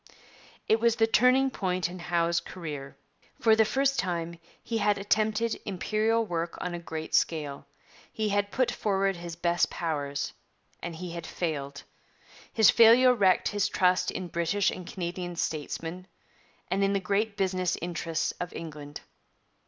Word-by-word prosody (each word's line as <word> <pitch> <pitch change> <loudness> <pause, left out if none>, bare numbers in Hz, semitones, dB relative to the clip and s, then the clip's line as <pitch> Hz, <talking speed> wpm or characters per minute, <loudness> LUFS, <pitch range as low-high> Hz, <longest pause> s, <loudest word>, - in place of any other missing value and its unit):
' - - -25
It 220 - +4
was 230 0 +3
the 225 - +4
turning 255 +4 +4
point 185 -5 -1
in 180 +1 -8
Howe's 170 -1 +1
career. 150 -7 -7 0.4
For 220 -1 +5
the 220 - +5
first 275 +3 +1
time 170 -3 -2 0.2
he 230 -1 -2
had 205 -1 +2
attempted 215 +3 0
Imperial 215 +3 0
work 170 -3 -3
on 180 - -3
a 175 - -4
great 160 -2 -6
scale; 150 -4 0 0.4
he 215 -1 -1
had 205 0 +1
put 255 +3 +1
forward 195 -2 0
his 170 -1 -7
best 175 0 +1
powers; 145 -4 -3 0.5
and 170 -1 -5
he 180 +1 -6
had 170 -1 -6
failed. 145 -4 -4 0.7
His 220 -3 +6
failure 240 +2 +7
wrecked 195 -6 +3
his 205 -1 0
trust 180 0 +2
in 185 - -4
British 170 +4 +1
and 180 -2 -8
Canadian 175 -1 -4
statesmen, 165 +3 -4 0.6
and 195 +1 0
in 195 0 +2
the 200 - +2
great 200 +2 -1
business 185 -2 0
interests 165 -1 -2
of 175 - -4
England. 150 -3 -8
180 Hz, 155 wpm, -28 LUFS, 170-215 Hz, 0.7 s, failure